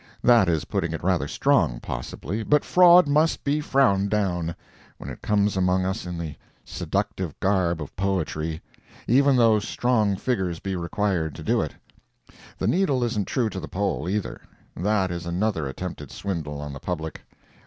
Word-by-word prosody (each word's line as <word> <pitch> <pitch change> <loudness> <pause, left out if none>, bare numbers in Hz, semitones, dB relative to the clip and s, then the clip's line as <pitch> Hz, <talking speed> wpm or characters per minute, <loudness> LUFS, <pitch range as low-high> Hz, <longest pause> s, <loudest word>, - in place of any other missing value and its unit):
That 120 -7 +5
is 80 -4 0
putting - - -2
it - - -5
rather - - +1
strong, - - +2
possibly, 100 - -5
but 150 +6 +2
fraud 180 -2 +7
must 150 +3 +2
be 145 +2 0
frowned 110 -9 +2
down, 90 -6 -1 0.4
when - - -8
it - - -10
comes 105 -1 +1
among 90 0 +2
us 95 -1 -3
in 90 -1 -5
the 80 -3 -5 0.3
seductive 90 -6 -3
garb 95 -4 +1
of 75 - -8
poetry, 80 -5 -2 0.4
even 140 +3 +4
though 115 -3 +5
strong 110 -1 +1
figures 95 -6 -1
be 95 +2 -4
required 85 -3 -1
to - - -8
do - - +2
it. - - -4 0.8
The - - -2
needle 155 -9 +2
isn't 110 -4 -1
true 120 -5 0
to 95 - -5
the - - -7
pole, 95 -4 -2
either. 105 0 -3 0.3
That 95 -1 0
is 85 -1 -5
another 90 -3 -1
attempted 75 0 -6
swindle 80 -7 -4
on 75 -1 -6
the 70 - -8
public. 80 -3 -5
95 Hz, 165 wpm, -25 LUFS, 85-110 Hz, 0.8 s, fraud